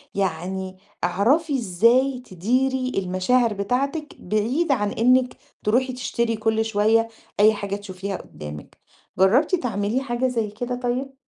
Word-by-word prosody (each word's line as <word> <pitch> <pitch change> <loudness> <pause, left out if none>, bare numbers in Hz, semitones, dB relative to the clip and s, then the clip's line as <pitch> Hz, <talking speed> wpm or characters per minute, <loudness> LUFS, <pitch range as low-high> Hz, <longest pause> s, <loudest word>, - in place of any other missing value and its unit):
يعني 190 0 -2 0.3
اعرفي 265 - +2
إزاي 240 +6 +3
تديري 255 +7 0
المشاعر 195 +6 +1
بتاعتِك 275 +10 -2
بعيد 235 - 0
عن 205 -6 +1
إنِّك 250 +3 +2 0.3
تروحي 255 +4 +1
تشتري 235 -2 -1
كل 220 0 0
شوية 220 +1 +2 0.3
أي 215 +1 +6
حاجة 200 -1 -3
تشوفيها 195 -1 -5
قُدّامِك. 75 0 -10 0.4
جرّبتِ 255 - +4
تعملي 225 - -1
حاجة 255 -1 -1
زي 230 -4 -1
كده 245 +4 -4
طيب؟ 255 +3 -2
225 Hz, 120 wpm, -23 LUFS, 200-255 Hz, 0.4 s, أي